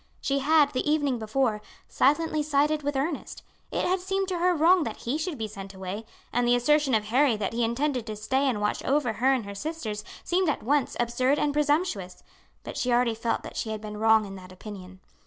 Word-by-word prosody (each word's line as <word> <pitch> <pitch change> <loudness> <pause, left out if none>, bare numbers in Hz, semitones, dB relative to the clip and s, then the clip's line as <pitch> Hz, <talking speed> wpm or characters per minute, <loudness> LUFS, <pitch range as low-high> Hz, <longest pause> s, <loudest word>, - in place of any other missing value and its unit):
She 275 0 0
had, 295 0 +4
the 255 +3 -1
evening 285 -5 +1
before, 220 0 0 0.3
silently 310 +2 +2
sided 300 +1 +1
with 290 0 -2
Ernest. 285 +3 -3 0.3
It - - -1
had 370 +1 +1
seemed 385 +1 -1
to 360 -2 -2
her 360 +1 +3
wrong 340 +4 +5
that - - -5
he 245 +4 -3
should 315 0 -3
be 220 -2 -3
sent 195 -2 -9
away, 190 +4 -6 0.3
and 245 0 +2
the 245 - +5
assertion 275 +1 +3
of 215 - +1
Harry 245 +2 +2
that 205 0 -2
he 235 +1 0
intended 245 +1 -1
to 215 - -4
stay 265 +6 0
and 230 -5 -1
watch 210 0 -1
over 270 -4 +1
her 255 +4 +2
and 255 -5 0
her 200 - -6
sisters 220 -4 -4 0.2
seemed 360 -1 +1
at 290 - -2
once 280 +3 +1
absurd 255 +4 +1
and 295 -1 +1
presumptuous; 290 - 0 0.4
but - - -7
she 250 - 0
already 240 -1 +3
felt 230 +1 -2
that - - -9
she 225 - -2
had 215 -1 -3
been 210 0 -7
wrong 220 0 +4
in 195 - -8
that 185 0 -12
opinion. 185 -1 -10
255 Hz, 220 wpm, -27 LUFS, 215-295 Hz, 0.4 s, wrong